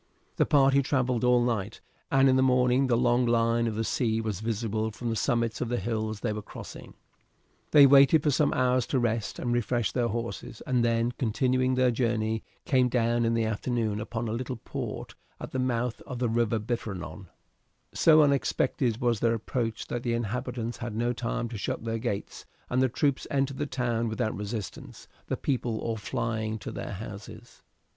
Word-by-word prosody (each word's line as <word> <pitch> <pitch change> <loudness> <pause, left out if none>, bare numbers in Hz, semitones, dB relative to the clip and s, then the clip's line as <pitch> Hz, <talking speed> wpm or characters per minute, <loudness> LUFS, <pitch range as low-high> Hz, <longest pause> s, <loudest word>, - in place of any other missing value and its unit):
The - - +3
party 140 -1 +4
travelled 130 -3 0
all 125 -1 +4
night, 110 -5 -2 0.3
and 135 0 +4
in 130 - +4
the 130 - +4
morning 125 0 +3
the 120 -2 +2
long 120 0 +3
line 115 0 +2
of 110 - -2
the 110 - -1
sea 110 -1 0
was 110 -4 -3
visible 110 0 -2
from 115 +2 -4
the - - -1
summits 115 -1 0
of 125 - -1
the 120 - 0
hills 110 0 -3
they 110 -3 -1
were 105 - -4
crossing. - - -10 0.7
They 145 -2 +8
waited 140 +2 +6
for 150 - +3
some 145 +1 +2
hours 125 -1 +2
to 130 - +1
rest 115 -2 -1
and 120 -1 -1
refresh 120 -1 0
their 120 -2 0
horses, 115 0 -5
and 125 -2 +1
then, 115 0 +1
continuing 130 +2 +1
their 130 -1 +3
journey, 110 -2 0 0.2
came 130 -2 +3
down 120 -1 +1
in 115 0 +1
the 115 - +1
afternoon 110 -1 -1
upon 115 +2 -4
a - - -2
little 125 +2 -3
port 115 - -6 0.3
at - - -7
the 130 - -2
mouth 125 -2 -1
of 125 - -5
the 120 -1 0
river 115 0 +1
Biferno. 100 -6 -5 0.7
So 155 -1 +6
unexpected 130 -4 +1
was 120 -3 +1
their 115 0 +2
approach 115 0 -3
that 120 - -4
the 120 -1 -1
inhabitants 120 +1 -3
had 120 -3 -5
not 120 +1 -1
time 120 0 -2
to 110 -3 -6
shut - - -3
their 115 0 -2
gates, 100 -2 -4 0.2
and 125 +1 +2
the 130 - +3
troops 140 +3 0
entered 135 -1 -1
the 145 - -1
town 120 -3 -1
without 110 0 -2
resistance, 105 0 -6 0.2
the - - -2
people 120 -4 -1
all 115 +1 -2
flying 110 +1 -2
to 100 - -7
their - - -5
houses. 110 +3 -9
120 Hz, 190 wpm, -28 LUFS, 110-125 Hz, 0.7 s, They